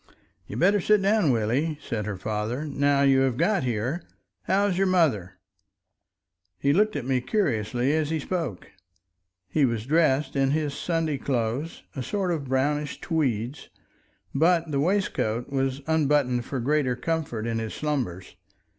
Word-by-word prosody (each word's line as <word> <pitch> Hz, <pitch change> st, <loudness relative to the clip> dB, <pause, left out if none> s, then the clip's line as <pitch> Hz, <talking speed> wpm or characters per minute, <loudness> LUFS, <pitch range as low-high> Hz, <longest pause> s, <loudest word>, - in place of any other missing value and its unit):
"You'd -, -, -6 dB
better 200 Hz, +3 st, +3 dB
sit 210 Hz, +3 st, +4 dB
down, 200 Hz, -5 st, +3 dB
Willie," 130 Hz, +7 st, +1 dB
said 110 Hz, -7 st, -4 dB
her 100 Hz, -2 st, -3 dB
father; 110 Hz, +8 st, -3 dB
"now 140 Hz, -1 st, +2 dB
you 135 Hz, -1 st, +5 dB
have 130 Hz, -3 st, +1 dB
got 190 Hz, +4 st, +2 dB
here. 125 Hz, +7 st, -1 dB, 0.4 s
How's 200 Hz, 0 st, +2 dB
your 195 Hz, +1 st, +2 dB
mother?" 110 Hz, -, +1 dB, 1.2 s
He 140 Hz, 0 st, +2 dB
looked 215 Hz, +4 st, +2 dB
at -, -, -3 dB
me 130 Hz, -1 st, +1 dB
curiously 125 Hz, -, 0 dB
as 155 Hz, -1 st, 0 dB
he 160 Hz, -, 0 dB
spoke. 155 Hz, -, -4 dB, 0.8 s
He 150 Hz, +9 st, +1 dB
was 115 Hz, -4 st, 0 dB
dressed 150 Hz, -1 st, +2 dB
in 135 Hz, -1 st, +2 dB
his 150 Hz, 0 st, 0 dB
Sunday 160 Hz, -3 st, -1 dB
clothes, 130 Hz, +4 st, -2 dB
a 135 Hz, -, -3 dB
sort 185 Hz, -, -1 dB
of 155 Hz, -5 st, -2 dB
brownish 145 Hz, +3 st, -1 dB
tweeds, 135 Hz, -, -2 dB, 0.6 s
but 165 Hz, +2 st, +2 dB
the 140 Hz, -, 0 dB
waistcoat 145 Hz, -, 0 dB
was 135 Hz, 0 st, -1 dB
unbuttoned 145 Hz, -6 st, +2 dB
for 135 Hz, -, -3 dB
greater 135 Hz, 0 st, +1 dB
comfort 135 Hz, -5 st, -2 dB
in 115 Hz, -1 st, -1 dB
his 110 Hz, -1 st, -4 dB
slumbers. 125 Hz, -, -3 dB
140 Hz, 150 wpm, -26 LUFS, 120-160 Hz, 1.2 s, you